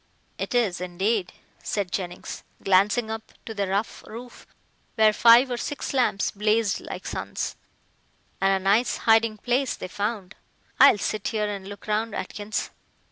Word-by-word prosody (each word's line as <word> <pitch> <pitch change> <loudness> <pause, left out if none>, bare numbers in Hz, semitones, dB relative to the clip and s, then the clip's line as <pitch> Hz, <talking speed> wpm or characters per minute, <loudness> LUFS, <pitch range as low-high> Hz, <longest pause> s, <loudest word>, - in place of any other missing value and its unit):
"It - - -3
is, 200 -8 +1
indeed," 185 +2 -1 0.3
said 200 -4 -2
Jennings, 180 -2 -5 0.2
glancing 205 +4 +3
up 220 0 -7
to 225 - -6
the 200 -2 -1
rough 200 +3 -2
roof 240 +3 -10 0.5
where 215 -1 +5
five 235 +4 +6
or 245 - -1
six 285 +4 -4
lamps 245 -6 +1
blazed 210 +1 +1
like - - -8
suns, - - -4 0.9
"and 195 0 +4
a 190 -1 +1
nice 225 +5 +3
hiding 225 -1 +4
place 250 +4 0
they - - -6
found. 205 0 -3 0.5
I'll - - +8
sit 210 +1 -2
here 215 -2 -1
and 200 -2 -5
look 205 0 -10
round, 215 +2 -1
Atkins." 210 +1 -4
210 Hz, 150 wpm, -25 LUFS, 195-230 Hz, 0.9 s, I'll